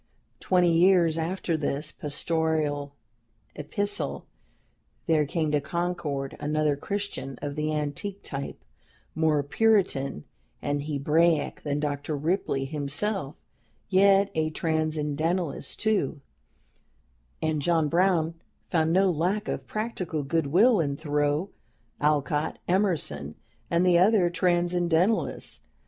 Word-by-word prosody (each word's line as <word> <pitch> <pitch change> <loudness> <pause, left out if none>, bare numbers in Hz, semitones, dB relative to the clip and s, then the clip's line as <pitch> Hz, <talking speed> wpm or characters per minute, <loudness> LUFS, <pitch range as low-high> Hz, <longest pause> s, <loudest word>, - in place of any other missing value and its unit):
Twenty 180 -2 +3
years 175 -2 +4
after 165 +1 -1
this 150 0 -2
pastoral 150 -2 -1 0.6
epistle, 200 +8 -2 0.8
there 155 -3 +2
came 155 0 -1
to 150 -1 +2
Concord 170 -4 -3
another 150 0 +1
Christian 140 -6 -4
of 145 -1 -4
the 155 0 -1
antique 155 +7 -3
type, 140 0 -5 0.6
more 155 -2 +2
Puritan 145 - +1 0.4
and 145 0 -1
Hebraic 155 +2 +1
than 145 -1 -2
Dr. 145 0 -2
Ripley 150 -3 -1
himself, 150 +4 -2 0.5
yet 195 +1 +4
a 155 0 0
Transcendentalist, 155 0 -1
too, 195 -10 0 1.2
and 155 -2 -1
JOHN 165 0 +2
BROWN 170 -1 +2 0.4
found 160 -2 +2
no 190 +2 +4
lack 185 +7 -1
of - - -4
practical 190 -8 -3
good 160 +1 0
will 210 - +5
in 140 -4 0
Thoreau, 150 +4 0 0.5
Alcott, 150 0 0
Emerson, 160 - 0 0.3
and 170 +2 +2
the 175 -1 +5
other 185 -2 +4
Transcendentalists. 175 +2 +1
160 Hz, 105 wpm, -27 LUFS, 145-180 Hz, 1.2 s, will